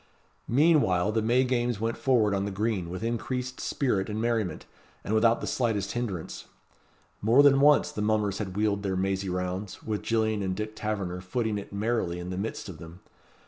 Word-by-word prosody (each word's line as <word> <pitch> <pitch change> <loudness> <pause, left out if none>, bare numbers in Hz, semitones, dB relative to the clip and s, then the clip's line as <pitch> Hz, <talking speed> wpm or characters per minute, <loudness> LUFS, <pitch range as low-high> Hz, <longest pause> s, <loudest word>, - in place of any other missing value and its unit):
Meanwhile 120 - +3
the 110 +1 +1
May 120 +4 +3
games 120 -3 0
went 115 +1 -1
forward 115 -6 +2
on 100 0 0
the - - -2
green 100 -3 -1
with 90 +4 -5
increased 125 +2 -3
spirit 105 -9 -1
and 105 +1 -3
merriment, 115 -4 -1 0.4
and 105 - -2
without 115 +1 +3
the - - -3
slightest 110 -6 -1
hinderance. 105 -9 -4 0.8
More 115 +7 +5
than 140 -1 +6
once 145 0 +5
the 105 - -4
mummers 105 -2 +1
had 95 -3 -4
wheeled 105 -1 +1
their 95 -2 -1
mazy 95 0 -1
rounds, 90 +2 -4
with 105 -2 -2
Gillian 110 -2 0
and 95 -1 -1
Dick 110 +2 -5
Taverner 100 -5 -3
footing 105 +2 -2
it 100 - -10
merrily 100 -4 -1
in 90 +1 -6
the - - -3
midst 110 +3 -4
of 85 -5 -9
them. 85 +2 -11
105 Hz, 185 wpm, -28 LUFS, 95-115 Hz, 0.8 s, than